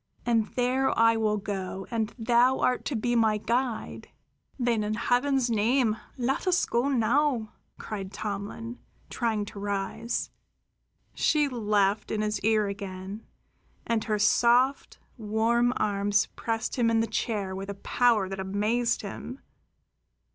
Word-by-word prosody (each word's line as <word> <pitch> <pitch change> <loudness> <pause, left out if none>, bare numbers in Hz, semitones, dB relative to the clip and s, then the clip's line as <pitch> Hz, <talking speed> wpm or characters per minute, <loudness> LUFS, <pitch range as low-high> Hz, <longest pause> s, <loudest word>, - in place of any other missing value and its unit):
And 230 -3 +2
there 255 +2 +1
I 230 0 +5
will 215 -1 +1
go, 195 -2 -4
and 225 -2 -1
thou 245 +2 +3
art 250 - +1
to 285 - -2
be 240 +2 0
my 220 -2 +3
guide." 235 +2 -2 0.5
"Then, 240 -4 +1
in 210 +1 -1
Heaven's 250 +2 +1
name, 225 +1 +2 0.2
let 265 +8 -1
us 360 -1 +3
go 240 +4 0
now!" 255 -2 +1 0.2
cried 195 -3 -6
Tomlin, 210 +3 -5 0.3
trying 220 -4 -1
to 205 - -9
rise. 205 +3 -3 0.8
She 300 -2 +2
laughed 210 -4 +1
in 215 - -1
his 215 0 -1
ear 215 0 +2
again, 200 +1 -6 0.6
and 230 -2 0
her 215 -2 0
soft, 240 +5 +3 0.2
warm 225 +3 +2
arms 205 0 +1
pressed 225 +1 -2
him 240 -2 +3
back 230 - +2
in 225 - +4
the - - +1
chair 205 -5 -2
with 195 +1 -6
a 200 - -4
power 225 -1 +2
that 195 0 -6
amazed 210 +6 0
him. 245 +6 -7
225 Hz, 140 wpm, -27 LUFS, 205-240 Hz, 0.8 s, I